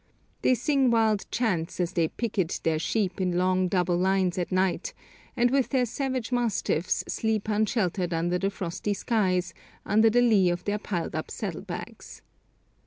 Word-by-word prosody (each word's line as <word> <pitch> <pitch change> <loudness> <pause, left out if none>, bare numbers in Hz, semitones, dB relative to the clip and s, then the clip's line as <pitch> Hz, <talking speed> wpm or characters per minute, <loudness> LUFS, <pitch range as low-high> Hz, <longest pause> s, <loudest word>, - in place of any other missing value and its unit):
They 255 - +4
sing 270 +1 +2
wild 220 -3 +2
chants 185 -10 -1
as 175 0 -1
they 165 -2 +2
picket 195 -4 -2
their 160 -1 +1
sheep 190 +1 -1
in 180 -1 0
long 185 0 +2
double 180 -1 +1
lines 185 0 +1
at 175 - -3
night, 190 - 0 0.4
and 245 0 +3
with 270 -2 +2
their 255 -2 +2
savage 255 0 -3
mastiffs 225 -8 0
sleep 220 -2 -1
unsheltered 205 -4 0
under 175 +2 0
the 195 +1 0
frosty 195 +2 -3
skies 185 -6 0 0.3
under 220 +2 +4
the 245 +2 +3
lee 210 -7 +4
of 175 0 -2
their 205 +1 -1
piled 180 -5 -3
up - - -4
saddlebags. - - -7
195 Hz, 160 wpm, -27 LUFS, 180-225 Hz, 0.4 s, They